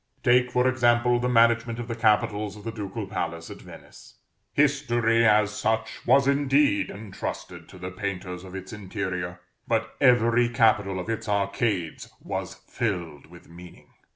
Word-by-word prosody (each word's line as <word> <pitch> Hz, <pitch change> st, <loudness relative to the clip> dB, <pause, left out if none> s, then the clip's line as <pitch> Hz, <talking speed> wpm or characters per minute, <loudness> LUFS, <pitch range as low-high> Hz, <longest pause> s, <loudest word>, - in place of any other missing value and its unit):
Take, 125 Hz, +1 st, +4 dB
for 125 Hz, +1 st, +2 dB
example, 120 Hz, -1 st, +3 dB
the 125 Hz, +1 st, -1 dB
management 115 Hz, 0 st, +3 dB
of 120 Hz, -1 st, -6 dB
the 115 Hz, -, -3 dB
capitals 105 Hz, -2 st, +1 dB
of 105 Hz, -, -12 dB
the 115 Hz, -, -4 dB
ducal 105 Hz, -1 st, -5 dB
palace 85 Hz, -4 st, -5 dB
at -, -, -10 dB
Venice. -, -, -14 dB, 0.4 s
History, 120 Hz, -5 st, +2 dB
as 105 Hz, -1 st, +4 dB
such, 110 Hz, +1 st, -2 dB
was 135 Hz, -1 st, +5 dB
indeed 140 Hz, -8 st, +2 dB
entrusted 100 Hz, -1 st, -7 dB
to -, -, -13 dB
the 90 Hz, +1 st, -6 dB
painters 90 Hz, -2 st, -5 dB
of 95 Hz, 0 st, -10 dB
its 95 Hz, +2 st, -8 dB
interior, 90 Hz, -3 st, -5 dB, 0.3 s
but -, -, -1 dB
every 120 Hz, -1 st, +4 dB
capital 105 Hz, -5 st, +2 dB
of 90 Hz, -, -6 dB
its 115 Hz, -1 st, -4 dB
arcades 100 Hz, -3 st, -1 dB
was -, -, -5 dB
filled 85 Hz, -10 st, -4 dB
with 85 Hz, +1 st, -16 dB
meaning. 85 Hz, +1 st, -14 dB
110 Hz, 155 wpm, -25 LUFS, 95-120 Hz, 0.4 s, was